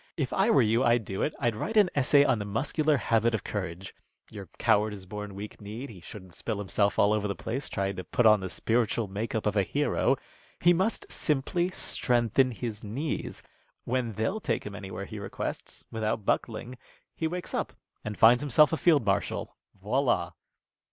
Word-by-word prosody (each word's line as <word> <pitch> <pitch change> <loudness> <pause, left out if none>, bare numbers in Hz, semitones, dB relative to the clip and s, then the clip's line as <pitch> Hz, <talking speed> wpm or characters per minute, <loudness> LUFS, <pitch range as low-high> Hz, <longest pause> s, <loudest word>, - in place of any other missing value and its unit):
"If 140 -6 -1
I 195 +4 +3
were 135 - +5
you, 115 +3 +2
I'd 120 -3 +3
do 95 0 -4
it. 150 - -1
I'd 120 -4 +1
write 220 - -2
an 205 -4 +5
essay 140 +1 +5
on 130 -5 +2
the - - -2
muscular 145 +8 +1
habit 115 -1 +2
of 110 - -4
courage. 95 -2 -5 0.4
Your 100 -5 -9
coward 110 -2 +2
is 95 -2 -9
born 105 0 -7
weak 105 +2 -8
kneed. 110 +6 -7
He 95 -5 -12
shouldn't 95 0 -11
spill 110 +5 -3
himself 100 0 0
all 100 +1 +4
over 105 -1 0
the 100 - -3
place 130 +5 -4
trying 95 -1 -2
to 95 - -4
put 120 +7 0
on 110 -1 +7
the 95 -1 -5
spiritual 115 +2 0
make 105 +5 -4
up 110 - -1
of 105 -1 +1
a 100 - +4
hero. 140 +5 +1 0.4
He 175 +1 +5
must 190 +6 -1
simply 155 +4 0
strengthen 125 - +1
his 115 -2 -5
knees. 130 +9 -4 0.4
When 120 -2 -1
they'll 110 - -1
take 115 - -2
him 105 - -6
anywhere 100 -1 -6
he 110 0 -8
requests, 100 - -6
without 110 -1 -2
buckling, 120 +3 -2 0.4
he 160 - -1
wakes 180 +2 -5
up - - -1 0.3
and 105 -1 -5
finds 120 +2 +6
himself 145 +2 +4
a - - +2
field 155 -9 +3
marshal. 100 0 -1 0.2
_Voilà! - - +1
110 Hz, 190 wpm, -28 LUFS, 105-135 Hz, 0.4 s, on